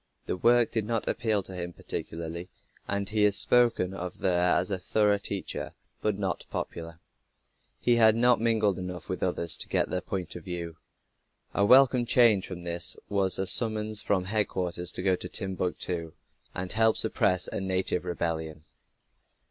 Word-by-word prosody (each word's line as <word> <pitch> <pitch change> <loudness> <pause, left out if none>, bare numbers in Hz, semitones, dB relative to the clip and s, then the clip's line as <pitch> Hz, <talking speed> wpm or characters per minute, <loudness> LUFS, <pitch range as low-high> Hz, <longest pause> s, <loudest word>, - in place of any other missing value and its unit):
The - - -3
work 120 +4 +2
did 110 -3 -2
not 115 0 -3
appeal 110 -4 -1
to 95 - -9
him 90 -1 -6
particularly 85 +2 -7 0.4
and 100 0 -2
he 105 0 0
is 105 -1 +3
spoken 120 -7 +4
of 90 -1 -7
there 90 -1 +1
as 90 +3 -1
a 95 - -2
thorough 105 +2 +1
teacher, 100 -1 -5 0.3
but 105 -2 -1
not 95 -2 -3
popular. 85 -1 -7 0.8
He 120 -1 +2
had 110 -1 +5
not 120 0 +2
mingled 110 -4 +1
enough 90 -2 -7
with 95 - -4
others 85 -2 +5
to - - -3
get - - -1
their 90 - -2
point 95 -2 -5
of 90 - -9
view. 85 -2 -7 0.8
A 100 - +1
welcome 125 +1 +5
change 115 -5 +3
from 90 -2 -8
this 85 0 -4
was 95 -2 +4
a 95 - -1
summons 110 0 +4
from 95 -3 0
headquarters 90 -3 -1
to - - -4
go 95 -1 +2
to - - -8
Timbuctoo, 90 -4 -4 0.4
and 90 0 -4
help 110 0 +2
suppress 90 -1 0
a - - -4
native 95 -1 -1
rebellion. 80 -3 -4
95 Hz, 165 wpm, -27 LUFS, 90-110 Hz, 0.8 s, had